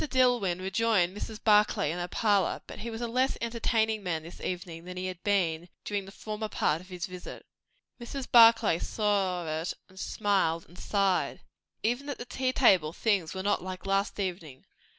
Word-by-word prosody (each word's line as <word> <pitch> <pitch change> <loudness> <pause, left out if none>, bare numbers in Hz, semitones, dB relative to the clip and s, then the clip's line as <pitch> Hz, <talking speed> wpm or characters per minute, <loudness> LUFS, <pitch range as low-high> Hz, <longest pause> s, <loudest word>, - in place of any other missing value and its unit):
Dillwyn 245 - +2
rejoined 190 -1 +1
Mrs. 215 +1 -6
Barclay 210 -8 +4
in 175 - -4
her 175 - -2
parlour, 205 -3 +1
but - - -10
he 235 - -5
was 225 0 -6
a 240 - -1
less 255 +3 +1
entertaining 225 -2 0
man 165 -4 -2
this 170 - -11
evening 175 -2 -5
than 180 +1 -8
he 185 - -3
had 185 -2 -5
been 175 -4 +1 0.2
during 205 -2 -2
the 195 - -11
former 215 +1 -5
part 155 -4 0
of 185 - -16
his 180 -2 -4
visit. 180 -1 -9 0.6
Mrs. 260 +2 -5
Barclay 230 -7 +7
saw 195 -6 0
it, 170 - -3
and 190 0 -14
smiled, 190 -6 0
and 175 +2 -15
sighed. 195 -3 0 0.4
Even 245 +6 -1
at 285 - -3
the 240 - -7
tea 255 +1 -1
table 185 - +4
things 195 -6 0
were 190 - -3
not 205 0 +1
like 185 +1 -7
last 195 +2 0
evening. 170 -8 -4
195 Hz, 185 wpm, -29 LUFS, 180-225 Hz, 0.6 s, Barclay